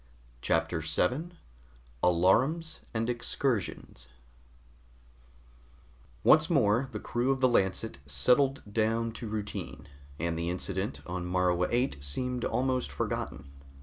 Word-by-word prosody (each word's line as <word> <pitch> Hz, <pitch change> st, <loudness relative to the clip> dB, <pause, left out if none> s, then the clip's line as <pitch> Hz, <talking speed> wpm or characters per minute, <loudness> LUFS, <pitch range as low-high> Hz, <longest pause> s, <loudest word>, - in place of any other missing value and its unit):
CHAPTER 80 Hz, 0 st, 0 dB
7 125 Hz, -, 0 dB, 0.7 s
ALARUMS 120 Hz, -, +2 dB
AND 115 Hz, 0 st, -1 dB
EXCURSIONS 120 Hz, -, -2 dB, 2.2 s
Once 155 Hz, 0 st, +6 dB
more 130 Hz, -5 st, +3 dB
the -, -, -4 dB
crew 120 Hz, +2 st, -1 dB
of 135 Hz, -1 st, +2 dB
the 130 Hz, -, +5 dB
Lancet 95 Hz, -, 0 dB
settled 125 Hz, -, +3 dB
down 115 Hz, +1 st, +1 dB
to 115 Hz, 0 st, -7 dB
routine, 105 Hz, -1 st, -5 dB, 0.3 s
and 85 Hz, +1 st, -2 dB
the 85 Hz, 0 st, -1 dB
incident 95 Hz, +4 st, -3 dB
on 90 Hz, 0 st, -4 dB
Morua 90 Hz, 0 st, +2 dB
VIII 125 Hz, -, 0 dB
seemed 125 Hz, -, -2 dB
almost 130 Hz, 0 st, 0 dB
forgotten. 70 Hz, -, -4 dB
110 Hz, 110 wpm, -30 LUFS, 90-130 Hz, 2.2 s, Once